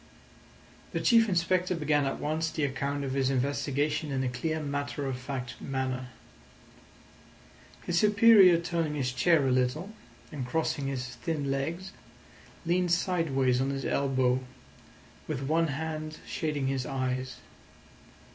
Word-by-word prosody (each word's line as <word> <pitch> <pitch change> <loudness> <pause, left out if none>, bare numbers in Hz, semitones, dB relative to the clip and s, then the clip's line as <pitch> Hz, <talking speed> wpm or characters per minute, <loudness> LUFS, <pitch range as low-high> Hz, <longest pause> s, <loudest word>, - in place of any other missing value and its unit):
The - - 0
Chief 230 -2 +4
Inspector 180 0 +1
began 150 -3 +1
at 135 - -2
once 155 +2 -1
the 155 - -3
account 140 +1 -2
of 135 -1 -3
his 135 -1 +1
investigation 145 +3 -1
in 130 -1 0
a 130 - 0
clear 155 +6 -2
matter 145 -1 -3
of 135 -1 -2
fact 125 -1 -6
manner. 130 -1 -3 1.8
His 175 -1 +1
superior 210 -4 +7
turning 165 -3 -2
his 130 -3 -1
chair 150 +2 +3
a - - +2
little, 130 +10 0 0.4
and 140 -3 -4
crossing 145 0 -1
his 130 -2 -3
thin 140 +2 -2
legs, 165 +7 -3 0.7
leaned 175 +1 +1
sideways 145 -8 +1
on 135 - 0
his 135 -1 -3
elbow, 130 -2 +1 0.9
with 135 - -3
one 160 +4 +2
hand 155 +1 -4
shading 150 -6 -2
his 135 -1 -1
eyes. 130 -1 -2
145 Hz, 135 wpm, -29 LUFS, 130-165 Hz, 1.8 s, superior